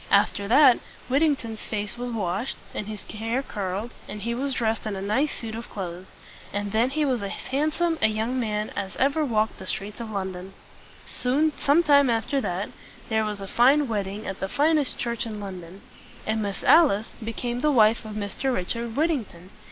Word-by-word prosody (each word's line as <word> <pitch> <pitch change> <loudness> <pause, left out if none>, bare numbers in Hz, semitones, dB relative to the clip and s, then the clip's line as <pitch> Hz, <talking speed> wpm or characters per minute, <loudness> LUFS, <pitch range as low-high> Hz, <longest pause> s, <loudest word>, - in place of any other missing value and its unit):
After 200 - +3
that, 260 +2 +7 0.3
Whittington's 270 -6 +1
face 210 0 -3
was 245 +1 -4
washed, 210 +1 -2 0.2
and 205 - -4
his 215 -1 -6
hair 225 +5 -2
curled, 200 +1 -3 0.2
and 210 0 -6
he 235 +1 -1
was 265 +2 -2
dressed 225 -3 0
in 210 - -2
a - - -4
nice 235 +10 +1
suit 225 -2 -5
of 230 +1 -6
clothes; 180 -1 -6 0.4
and 205 0 -2
then 225 +4 +3
he 300 +2 0
was 255 -5 +1
as 200 - -3
handsome 310 +4 0
a - - +6
young 220 +4 -1
man 215 -2 -1
as 195 -2 -4
ever 285 +4 +2
walked 220 -5 0
the 190 - -8
streets 205 +4 -3
of 230 -2 -5
London. 190 -2 -5 0.5
Some 285 +5 +1
time 285 -2 +4
after 235 +4 +1
that, 185 -2 -2 0.4
there 220 0 +2
was 210 -1 -3
a 195 - -5
fine 270 +7 +4
wedding 205 -1 -3
at 195 - -5
the 190 - -2
finest 300 +1 +2
church 235 -1 -2
in 215 -2 -5
London; 185 -1 -8 0.4
and 220 0 0
Miss 200 -2 -3
Alice 225 -11 +5
became 240 +2 -3
the 300 - +2
wife 225 -3 +5
of 215 -1 -7
Mr. 215 +6 -2
Richard 230 +3 -3
Whittington. 240 - -1
225 Hz, 185 wpm, -25 LUFS, 205-265 Hz, 0.5 s, that